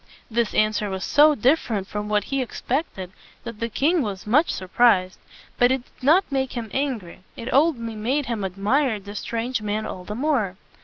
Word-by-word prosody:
This 235 0 0
answer 215 -1 +1
was 190 -1 -4
so 300 +1 +5
dif 270 +7 +3
fer 225 - -4
ent 195 -2 -3
from 210 0 -4
what 210 -1 +2
he 275 +3 -2
expected, 245 - -3 0.3
that 230 -3 -8
the 230 - -2
king 315 +8 +2
was 200 -6 -4
much 285 +10 +3
sur 185 - -5
prised. 190 -4 +3 0.4
But 245 +1 +5
it 260 -2 0
did - - -25
not 320 +5 +4
make 265 -1 -1
him 230 -4 -5
angry; 250 -12 -3 0.2
it 235 - -5
only 265 -6 +2
made 260 +7 -1
him 230 -5 -3
admire 210 +6 0
the 205 +1 -10
strange 230 +3 -3
man 210 +1 -2
all 185 - -6
the 210 +3 -6
more. 240 -9 0
230 Hz, 200 wpm, -23 LUFS, 210-270 Hz, 0.4 s, so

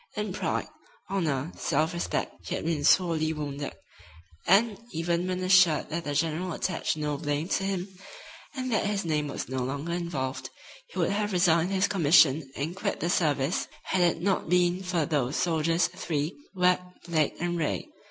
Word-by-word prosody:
In 210 -2 -2
pride, - - -2 0.4
honor, 160 -5 -1
self 155 +3 0
respect, 170 - -3
he - - -1
had - - -4
been 160 -3 -1
sorely 160 -1 +3
wounded, 145 -2 -5 0.7
and, 205 +3 +4
even 170 +2 -1
when 185 0 -2
assured 185 -4 +4
that 170 +1 -3
the 145 -1 -2
general 165 +3 0
attached 165 -1 -1
no 150 -1 -2
blame 145 +1 -1
to 195 - +1
him, 190 -1 -2 0.7
and 255 -1 -3
that 220 - +1
his 205 -3 -1
name 150 -2 0
was 140 - -5
no 130 0 -2
longer 140 +6 -3
involved, 150 -7 -3 0.4
he 485 - -12
would - - +1
have 205 0 -1
resigned 175 -1 +3
his 195 0 +2
commission 155 -6 +4
and 155 +6 -3
quit - - -2
the 170 - 0
service 150 -2 +1 0.2
had 185 - 0
it 170 -1 +2
not 195 -4 0
been 180 +1 +3
for 180 -4 0
these 145 -3 0
soldiers 165 0 +2
three, 165 -3 -3 0.2
Webb, 180 0 +3 0.2
Blake 160 -4 +1
and 175 0 -1
Ray. 100 - -1
170 Hz, 170 wpm, -28 LUFS, 150-185 Hz, 0.7 s, and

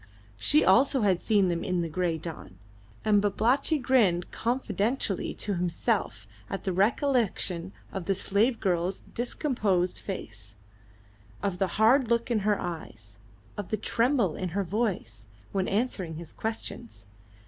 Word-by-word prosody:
She 105 +10 +4
also 260 +7 +4
had 190 -4 +2
seen 205 -4 +3
them 170 -1 -1
in 180 -2 0
the 170 - -1
grey 170 0 -1
dawn. 155 - -8 0.5
And 210 -1 +4
Babalatchi 235 +9 +2
grinned 235 -10 +2
confidentially 230 -3 -1
to 205 - -1
himself 175 - -1 0.2
at 195 - -4
the 190 - -1
recollection 200 - +1 0.2
of 190 -3 -4
the 195 - +1
slave 215 +5 +1
girl's 180 -1 0
discomposed 220 - 0
face, 110 - -7 0.9
of 185 -3 -1
the 195 - +2
hard 235 +4 +5
look 235 +1 +1
in 225 - +3
her 205 0 +1
eyes, 110 - -7 0.4
of 205 -3 -5
the 215 - 0
tremble 230 - +1
in 185 - -3
her 200 - +2
voice, 175 - -2 0.2
when 190 -1 0
answering 195 -6 -1
his 165 0 -8
questions. 225 - -5
195 Hz, 140 wpm, -28 LUFS, 175-230 Hz, 0.9 s, hard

